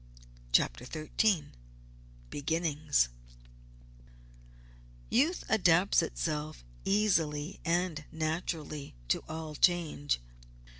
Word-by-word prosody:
CHAPTER 120 Hz, -, +2 dB
XIII 155 Hz, -, 0 dB, 0.8 s
BEGINNINGS 150 Hz, -, +1 dB, 2.0 s
Youth 305 Hz, +10 st, +2 dB
adapts 185 Hz, -3 st, +4 dB
itself 155 Hz, -, -3 dB, 0.2 s
easily 170 Hz, -7 st, +1 dB
and 170 Hz, -3 st, 0 dB
naturally 155 Hz, -, -3 dB
to -, -, +1 dB
all 160 Hz, -1 st, -5 dB
change. 155 Hz, -, +2 dB
160 Hz, 65 wpm, -31 LUFS, 150-180 Hz, 2.0 s, adapts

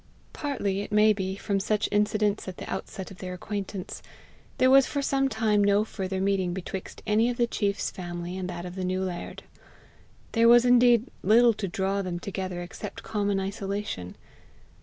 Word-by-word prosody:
Partly, 205 Hz, -10 st, -2 dB
it 205 Hz, -, -7 dB
may 210 Hz, +1 st, +5 dB
be, 190 Hz, -1 st, -3 dB
from 200 Hz, 0 st, -1 dB
such 210 Hz, +2 st, 0 dB
incidents 210 Hz, 0 st, +1 dB
at 185 Hz, -, -6 dB
the -, -, -7 dB
outset 190 Hz, 0 st, -5 dB
of 185 Hz, -, -12 dB
their 180 Hz, -1 st, -5 dB
acquaintance, 195 Hz, 0 st, -5 dB, 0.6 s
there 255 Hz, 0 st, +4 dB
was 270 Hz, 0 st, +7 dB
for 285 Hz, -1 st, -2 dB
some 270 Hz, 0 st, +1 dB
time 215 Hz, -3 st, +2 dB
no 200 Hz, +1 st, +4 dB
further 190 Hz, -3 st, -4 dB
meeting 190 Hz, -2 st, 0 dB
betwixt 190 Hz, 0 st, -6 dB
any 220 Hz, +2 st, +3 dB
of 245 Hz, -, -3 dB
the 240 Hz, -, +3 dB
chief's 205 Hz, -3 st, -1 dB
family 175 Hz, -1 st, -6 dB
and 185 Hz, -1 st, -4 dB
that 175 Hz, 0 st, -5 dB
of 180 Hz, -, -6 dB
the 185 Hz, 0 st, -4 dB
new 185 Hz, +1 st, -1 dB
laird. 180 Hz, -2 st, -5 dB, 0.9 s
There 230 Hz, 0 st, +4 dB
was 240 Hz, +1 st, +7 dB
indeed 245 Hz, 0 st, +5 dB
little 230 Hz, +4 st, +5 dB
to 205 Hz, -2 st, -4 dB
draw 195 Hz, +2 st, -1 dB
them 180 Hz, -2 st, -3 dB
together 185 Hz, -2 st, -4 dB
except 175 Hz, -, -8 dB
common 205 Hz, -2 st, 0 dB
isolation. 195 Hz, -, -4 dB
200 Hz, 180 wpm, -27 LUFS, 185-220 Hz, 0.9 s, was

